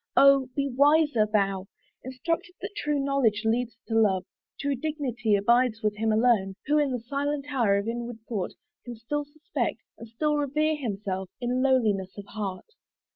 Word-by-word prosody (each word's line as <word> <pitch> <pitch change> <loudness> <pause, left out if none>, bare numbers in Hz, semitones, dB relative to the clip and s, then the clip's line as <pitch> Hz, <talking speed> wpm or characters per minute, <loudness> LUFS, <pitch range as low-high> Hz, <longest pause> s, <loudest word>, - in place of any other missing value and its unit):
O, 275 -2 +6
be 280 -1 0
wiser 285 -3 +4
thou! 195 -2 +1 0.4
Instructed 330 +7 -3
that 405 - -5
true 295 -7 -1
knowledge 270 -6 +1
leads 230 0 0
to 225 - -4
love, 200 -5 +3 0.3
True 285 0 0
dignity 255 -6 -1
abides 230 +2 +2
with 210 -1 +1
him 220 +1 +1
alone 215 -4 +2
Who, 300 +2 +3
in 290 -2 +2
the 250 - -1
silent 280 +4 -2
hour 220 -7 +3
of 200 +2 -2
inward 235 0 -4
thought, 205 -6 -3 0.3
Can 240 -1 -7
still 290 +6 -3
suspect, 310 +6 -3 0.2
and 230 - -9
still 295 +7 0
revere 305 +2 +1
himself, 195 -8 -4
In 250 +1 0
lowliness 215 -8 +1
of 200 - -7
heart. 200 -3 -5
245 Hz, 165 wpm, -27 LUFS, 215-285 Hz, 0.4 s, O